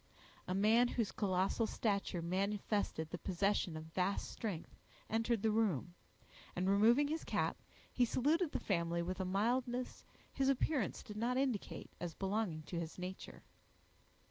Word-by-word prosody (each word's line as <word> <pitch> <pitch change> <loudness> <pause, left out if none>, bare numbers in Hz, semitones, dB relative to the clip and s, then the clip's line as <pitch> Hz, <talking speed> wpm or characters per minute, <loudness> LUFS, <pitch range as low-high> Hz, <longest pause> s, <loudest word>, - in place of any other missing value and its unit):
A 185 - -1
man, 220 +5 +5
whose 230 -4 -1
colossal 195 +3 +1
stature 200 -6 -1
manifested 195 -2 -1
the 180 - -4
possession 190 -2 0
of 155 - -6
vast 190 +2 0
strength, 200 -8 -5 0.4
entered 225 -1 +1
the 220 - +3
room, 195 - +1 0.6
and 180 +1 0
removing 225 +8 +5
his 315 +2 -2
cap, - - -1 0.3
he 250 - +3
saluted 300 +7 +2
the - - -1
family 170 -3 0
with 185 +2 -3
a 190 - 0
mildness 245 +6 0 0.3
his 270 -1 +2
appearance 275 - +1
did 210 - -8
not 240 +3 +1
indicate 260 -6 -2
as 175 -2 -4
belonging 195 -5 -1
to 170 +2 -4
his 165 -1 -5
nature. 185 +1 -7
205 Hz, 145 wpm, -37 LUFS, 180-235 Hz, 0.6 s, man